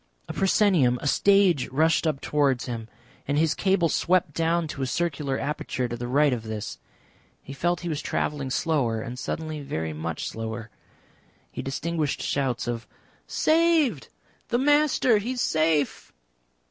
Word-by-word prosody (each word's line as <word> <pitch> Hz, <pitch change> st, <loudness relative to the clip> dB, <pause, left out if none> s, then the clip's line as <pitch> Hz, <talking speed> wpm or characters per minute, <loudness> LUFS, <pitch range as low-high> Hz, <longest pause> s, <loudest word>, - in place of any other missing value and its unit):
A -, -, -5 dB
proscenium, 185 Hz, -, +3 dB
a -, -, -8 dB
stage 190 Hz, -2 st, +4 dB
rushed 160 Hz, +5 st, +2 dB
up 150 Hz, -3 st, -1 dB
towards 140 Hz, -4 st, +1 dB
him, 115 Hz, -3 st, -5 dB, 0.4 s
and 145 Hz, +1 st, 0 dB
his 160 Hz, 0 st, +3 dB
cable 190 Hz, -3 st, +2 dB
swept 175 Hz, -1 st, +1 dB
down 165 Hz, +1 st, +1 dB
to 140 Hz, -, -6 dB
a 130 Hz, -, 0 dB
circular 145 Hz, -3 st, -1 dB
aperture 135 Hz, -3 st, -2 dB
to 120 Hz, -, -4 dB
the 120 Hz, +1 st, -5 dB
right 140 Hz, +2 st, +3 dB
of 120 Hz, -, -2 dB
this. 110 Hz, -1 st, -6 dB, 0.6 s
He 135 Hz, -, -8 dB
felt 175 Hz, +4 st, 0 dB
he 175 Hz, -, -5 dB
was 155 Hz, -3 st, -2 dB
travelling 145 Hz, -3 st, -2 dB
slower, 130 Hz, -6 st, 0 dB
and 120 Hz, +3 st, -6 dB
suddenly 155 Hz, +1 st, -4 dB
very 80 Hz, -, -3 dB
much 80 Hz, +1 st, -4 dB
slower. 115 Hz, 0 st, -5 dB, 0.8 s
He -, -, -5 dB
distinguished 155 Hz, +2 st, -2 dB
shouts 130 Hz, -4 st, -1 dB
of 115 Hz, -1 st, -3 dB, 0.4 s
"Saved! 315 Hz, -, +2 dB, 0.4 s
The 240 Hz, -, +1 dB
Master. 280 Hz, -4 st, +3 dB
He 235 Hz, +5 st, -3 dB
is 250 Hz, -, -3 dB
safe!" 155 Hz, -3 st, +1 dB
150 Hz, 155 wpm, -26 LUFS, 125-175 Hz, 0.8 s, stage